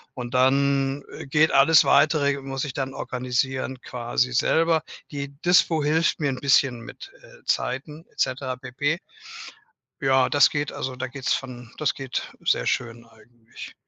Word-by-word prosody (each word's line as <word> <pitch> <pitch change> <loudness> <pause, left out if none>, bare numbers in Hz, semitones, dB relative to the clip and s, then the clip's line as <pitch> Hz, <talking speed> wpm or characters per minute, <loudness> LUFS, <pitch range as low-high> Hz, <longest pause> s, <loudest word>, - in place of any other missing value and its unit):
Und 125 0 -6
dann, 135 +1 +2
äh, - - -8
geht 155 +3 +3
alles 140 +3 +6
Weitere 145 -1 +3
muss 135 0 -4
ich 140 - -4
dann 135 -1 -4
organisieren 130 +1 -2
quasi 125 +1 -2
selber. 160 +5 +2 0.3
Die 140 -1 -4
Dispo 175 -3 +3
hilft 160 +3 +1
mir 145 -3 0
'n 130 - -5
bisschen 135 -3 +2
mit, - - -11
äh, - - -18
Zeiten 150 +5 -2
etc. 130 0 -2
pp. 145 +5 -2 1.0
Ja, 130 -1 +3
das 145 -1 +5
geht 145 -1 -2
also 130 -1 -5
da 130 +1 -4
geht 130 0 -10
es - - +3
von 125 -3 -6
das 155 - 0
geht 135 -2 -5
sehr - - +1
schön 120 -1 -2
eigentlich. 115 +1 -14
135 Hz, 155 wpm, -24 LUFS, 125-145 Hz, 1.0 s, alles